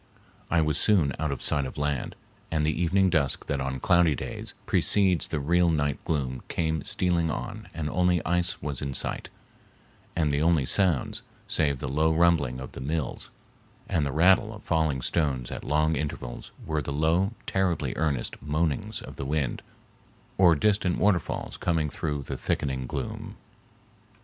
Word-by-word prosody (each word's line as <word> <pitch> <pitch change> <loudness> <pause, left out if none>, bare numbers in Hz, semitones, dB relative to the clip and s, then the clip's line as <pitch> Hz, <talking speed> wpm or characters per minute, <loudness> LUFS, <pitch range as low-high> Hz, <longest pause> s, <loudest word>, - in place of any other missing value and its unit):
I 85 - +3
was 75 -1 +1
soon 85 -11 +3
out 80 -1 -1
of 70 - -5
sight 70 -1 +2
of - - -9
land, 75 -3 -2 0.3
and 80 -2 0
the 80 - +2
evening 90 +4 +2
dusk 75 -6 +1
that 70 -2 -2
on 65 0 -3
cloudy 85 0 +4
days - - -4
precedes 95 -4 +3
the 75 - -2
real 85 +4 +3
night 70 -4 0
gloom 65 -5 -1
came 80 -2 -1
stealing 85 -3 +1
on 110 +6 -5
and 80 -2 -4
only 90 +2 +2
ice 90 0 0
was 70 -4 -3
in 70 -1 -3
sight, - - -3 0.9
and 80 -3 +1
the 70 +1 +1
only 80 -4 +3
sounds, 90 -2 +1 0.3
save 70 -3 +1
the - - -5
low 75 +4 +2
rumbling 80 -6 +2
of 65 - -7
the - - -8
mills 75 0 -3 0.6
and 80 - +1
the 70 - -1
rattle 95 - +4
of 105 - -13
falling 80 -6 0
stones 65 -7 0
at - - -6
long 75 +2 +2
intervals, 70 -4 -5
were 80 -1 -1
the 70 - -5
low, 80 +8 +1
terribly 85 -9 0
earnest 75 -5 -1
moanings 80 +8 -1
of - - -10
the - - -4
wind 75 -3 -1 0.7
or 90 -3 +6
distant 95 +1 +2
waterfalls 100 -3 0
coming 80 -4 0
through 75 -2 -3
the - - -5
thickening 65 -2 -2
gloom. - - -5
80 Hz, 165 wpm, -27 LUFS, 70-85 Hz, 0.9 s, or